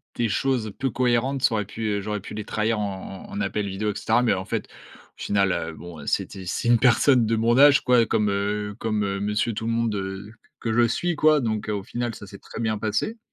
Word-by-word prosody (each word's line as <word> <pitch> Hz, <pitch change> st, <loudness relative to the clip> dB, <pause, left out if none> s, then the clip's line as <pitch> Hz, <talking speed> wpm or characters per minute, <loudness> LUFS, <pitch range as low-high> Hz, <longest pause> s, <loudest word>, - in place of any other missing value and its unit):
des 115 Hz, -2 st, 0 dB
choses 120 Hz, -4 st, 0 dB
peu 135 Hz, -, 0 dB
cohérentes, 125 Hz, +3 st, 0 dB
ça 115 Hz, -, +4 dB
aurait 105 Hz, -2 st, -1 dB
pu, 115 Hz, -, -9 dB, 0.2 s
heu, 100 Hz, -, -3 dB
j'aurais 105 Hz, +1 st, -3 dB
pu 105 Hz, -, -9 dB
les 105 Hz, 0 st, -4 dB
trahir 110 Hz, 0 st, 0 dB
en 95 Hz, -1 st, -5 dB
en -, -, -16 dB
en 100 Hz, -, -4 dB
appel 100 Hz, 0 st, -1 dB
vidéo 105 Hz, +2 st, -2 dB
et -, -, -9 dB
cetera. 115 Hz, +2 st, +2 dB
Mais, 120 Hz, -, +3 dB
en 95 Hz, 0 st, -3 dB
fait, -, -, -3 dB
au -, -, -18 dB
final, 100 Hz, -2 st, +2 dB
heu, 80 Hz, -2 st, -2 dB
bon, 80 Hz, -3 st, -10 dB
c'était 95 Hz, -2 st, -2 dB
c'est 120 Hz, +7 st, -2 dB
une 120 Hz, -1 st, +5 dB
personne 125 Hz, 0 st, +4 dB
de 115 Hz, +1 st, +1 dB
mon 115 Hz, +2 st, +2 dB
âge, 145 Hz, 0 st, +7 dB
quoi, 125 Hz, -3 st, +4 dB
comme, 105 Hz, -1 st, +1 dB
heu, 105 Hz, +1 st, -2 dB
comme, 110 Hz, -2 st, -1 dB
heu, 100 Hz, 0 st, -2 dB
monsieur 105 Hz, +3 st, 0 dB
tout 110 Hz, -, -4 dB
le 115 Hz, -, 0 dB
monde, 115 Hz, -2 st, 0 dB
heu, 95 Hz, +2 st, -5 dB, 0.3 s
que 115 Hz, -, -2 dB
je 120 Hz, 0 st, +4 dB
suis, 175 Hz, +7 st, -1 dB
quoi, 155 Hz, 0 st, +4 dB
donc, 110 Hz, -3 st, -2 dB
heu, 105 Hz, -, 0 dB
au 100 Hz, -2 st, -3 dB
final, 120 Hz, +1 st, -4 dB
ça -, -, -10 dB
s'est 100 Hz, 0 st, -12 dB
très -, -, -10 dB
bien 110 Hz, -1 st, 0 dB
passé 110 Hz, -, -2 dB
110 Hz, 250 wpm, -24 LUFS, 100-120 Hz, 0.3 s, âge